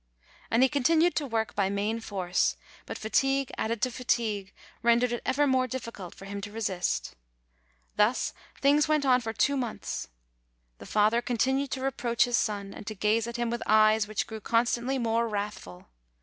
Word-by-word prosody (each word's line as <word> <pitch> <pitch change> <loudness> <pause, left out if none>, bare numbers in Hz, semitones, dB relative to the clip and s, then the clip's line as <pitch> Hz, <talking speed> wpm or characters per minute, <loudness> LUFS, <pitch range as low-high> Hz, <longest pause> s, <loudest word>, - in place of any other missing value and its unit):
And 230 +3 +4
he - - +6
continued 320 +5 +3
to 290 - -1
work 225 -2 -1
by 195 -2 +1
main 205 +3 -1
force; 190 -5 -1 0.3
but - - -5
fa 220 - -7
tigue 270 -1 +2
added 225 0 -2
to 255 - +2
fatigue 220 -5 -1 0.3
rendered 235 +1 +3
it 240 - -2
ever 290 +2 +3
more 260 -2 +2
difficult 230 -7 -7
for 195 - -11
him 200 0 -6
to 205 0 -7
resist. 200 -5 -2 0.8
Thus 210 +4 +2 0.3
things 290 +2 +4
went 305 -2 +2
on 255 -1 +4
for 225 -2 -3
two 245 +6 +1
months. 245 - -4 0.7
The - - -10
father 215 +3 +3
continued 265 +4 0
to 265 - -4
reproach 240 -3 +1
his 245 -1 0
son, 200 -2 -2
and 200 - -10
to 215 - -4
gaze 215 +3 +1
at 235 +1 -5
him 240 -1 -1
with 235 - -3
eyes 215 0 +5
which 215 -1 -2
grew 220 -1 -8
constantly 235 +4 +1
more 230 -1 +1
wrathful. 200 - -5
230 Hz, 180 wpm, -28 LUFS, 210-255 Hz, 0.8 s, he